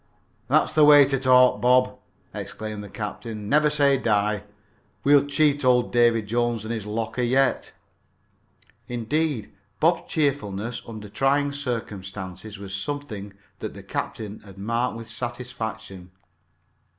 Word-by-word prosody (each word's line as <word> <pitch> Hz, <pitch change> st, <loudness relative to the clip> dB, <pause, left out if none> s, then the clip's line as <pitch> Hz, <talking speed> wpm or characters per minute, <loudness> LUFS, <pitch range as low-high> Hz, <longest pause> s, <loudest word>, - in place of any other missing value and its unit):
"That's -, -, +3 dB
the 155 Hz, -, +5 dB
way 145 Hz, -1 st, +8 dB
to 135 Hz, -1 st, 0 dB
talk, 125 Hz, -3 st, +5 dB
Bob," 125 Hz, +1 st, +4 dB, 0.4 s
exclaimed 110 Hz, -1 st, -6 dB
the 100 Hz, -, -10 dB
captain. 105 Hz, 0 st, -6 dB
"Never 150 Hz, +4 st, +4 dB
say 140 Hz, -2 st, +3 dB
die. 105 Hz, -3 st, +1 dB, 0.6 s
We'll 145 Hz, 0 st, +5 dB
cheat 145 Hz, 0 st, +2 dB
old 125 Hz, -1 st, +3 dB
Davy 120 Hz, -2 st, +4 dB
Jones 120 Hz, 0 st, -1 dB
and 115 Hz, -, -3 dB
his 110 Hz, -3 st, -5 dB
locker 110 Hz, +3 st, -3 dB
yet." 130 Hz, +3 st, +1 dB, 1.2 s
Indeed, 125 Hz, +2 st, -1 dB, 0.3 s
Bob's 165 Hz, +1 st, +1 dB
cheerfulness 120 Hz, -, -1 dB
under 110 Hz, -2 st, -8 dB
trying 140 Hz, +6 st, +1 dB
circumstances 105 Hz, -7 st, -5 dB
was 100 Hz, -1 st, -8 dB
something 105 Hz, -2 st, -4 dB, 0.3 s
that -, -, -6 dB
the -, -, -10 dB
captain 105 Hz, -1 st, -5 dB
had 100 Hz, -2 st, -15 dB
marked 115 Hz, +4 st, -1 dB
with 115 Hz, -, -8 dB
satisfaction. 110 Hz, -5 st, -6 dB
120 Hz, 125 wpm, -24 LUFS, 105-135 Hz, 1.2 s, way